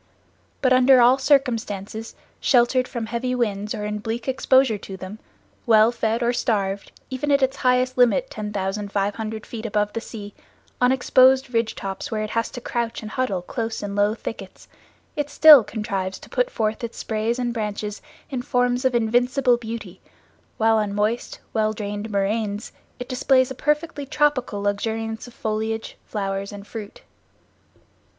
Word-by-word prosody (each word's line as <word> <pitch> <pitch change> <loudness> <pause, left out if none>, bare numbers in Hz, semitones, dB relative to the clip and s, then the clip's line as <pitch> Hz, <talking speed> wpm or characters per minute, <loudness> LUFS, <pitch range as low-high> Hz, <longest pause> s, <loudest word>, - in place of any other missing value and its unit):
But 255 -1 +5
under 255 0 +6
all 245 +3 +6
circumstances, 225 -6 0 0.2
sheltered 255 0 +3
from 235 -3 -4
heavy 240 +3 -2
winds 210 -4 -1
or 210 - -4
in 210 0 -3
bleak 225 +3 -4
exposure 260 -3 +3
to 190 0 -8
them, 190 +3 -8 0.5
well 220 0 +6
fed 230 0 -1
or 240 +1 +2
starved, 200 -5 -1 0.2
even 260 +3 -2
at 280 -1 +4
its 265 +1 +1
highest 255 0 +1
limit, - - +3
10,500 205 +1 -3
feet 225 -2 -7
above 210 -2 -1
the 230 - -3
sea, 205 -3 -9 0.5
on 250 0 +5
exposed 260 0 +4
ridge 230 -1 0
tops 195 -1 -5
where 215 -1 -2
it 215 - -5
has 230 0 0
to - - -7
crouch 235 -1 -3
and 215 - -7
huddle 210 -9 -1
close 225 +2 -4
in 200 -1 -4
low 205 +1 +2
thickets, 200 -4 -8 0.5
it 295 -2 -2
still 295 -3 +9
contrives 195 -3 -3
to - - -14
put - - +1
forth 220 - -2
its 235 - -5
sprays 220 +2 -1
and 245 -1 -1
branches 210 -2 -4 0.3
in 255 -2 -2
forms 245 0 +1
of 260 -1 +2
invincible 245 +3 +3
beauty, 220 -5 -7 0.6
while 225 0 +3
on 205 -2 -1
moist, 215 +3 -1
well 215 -1 +1
drained 205 0 -5
moraines 205 +1 -1 0.3
it 250 - -7
displays 260 0 +2
a - - -2
perfectly 300 +1 -1
tropical 275 -8 +1
luxuriance 225 +3 -2
of 245 - -13
foliage, 220 +1 -3
flowers 195 -1 -3
and 205 -1 -9
fruit. 210 -1 -9
225 Hz, 160 wpm, -23 LUFS, 210-250 Hz, 0.6 s, still